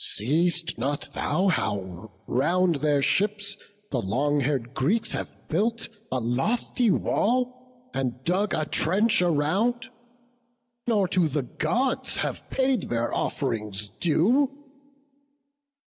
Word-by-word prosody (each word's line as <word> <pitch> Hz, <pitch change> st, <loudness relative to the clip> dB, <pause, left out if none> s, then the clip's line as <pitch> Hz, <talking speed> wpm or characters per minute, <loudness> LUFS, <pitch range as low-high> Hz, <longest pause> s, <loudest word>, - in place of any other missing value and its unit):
see'st 165 Hz, -, +1 dB
thou -, -, -7 dB
not 145 Hz, -, -3 dB, 0.5 s
How 95 Hz, -, -3 dB, 0.2 s
round 170 Hz, +6 st, +2 dB
their 145 Hz, -1 st, +2 dB
ships 205 Hz, +2 st, +1 dB, 0.4 s
the 125 Hz, -, 0 dB
long 140 Hz, +9 st, +1 dB
hair'd 130 Hz, -3 st, -1 dB
Greeks 215 Hz, -, +1 dB
have -, -, -2 dB, 0.2 s
built 225 Hz, +8 st, 0 dB, 0.2 s
A 130 Hz, -, +1 dB
lofty 215 Hz, -, 0 dB
wall, 250 Hz, +4 st, -1 dB
and 125 Hz, -1 st, -2 dB
dug 190 Hz, +6 st, +1 dB
a 155 Hz, -, 0 dB
trench 190 Hz, +8 st, +2 dB
around, 195 Hz, -, +1 dB, 1.0 s
Nor 210 Hz, -5 st, +3 dB
to 175 Hz, -2 st, +3 dB
the 145 Hz, -1 st, -1 dB
Gods 230 Hz, -, 0 dB
have -, -, -3 dB
paid 260 Hz, -2 st, +1 dB
their 120 Hz, 0 st, -1 dB
off'rings 105 Hz, -6 st, -1 dB
due! 210 Hz, -, +2 dB
165 Hz, 115 wpm, -26 LUFS, 130-220 Hz, 1.0 s, Nor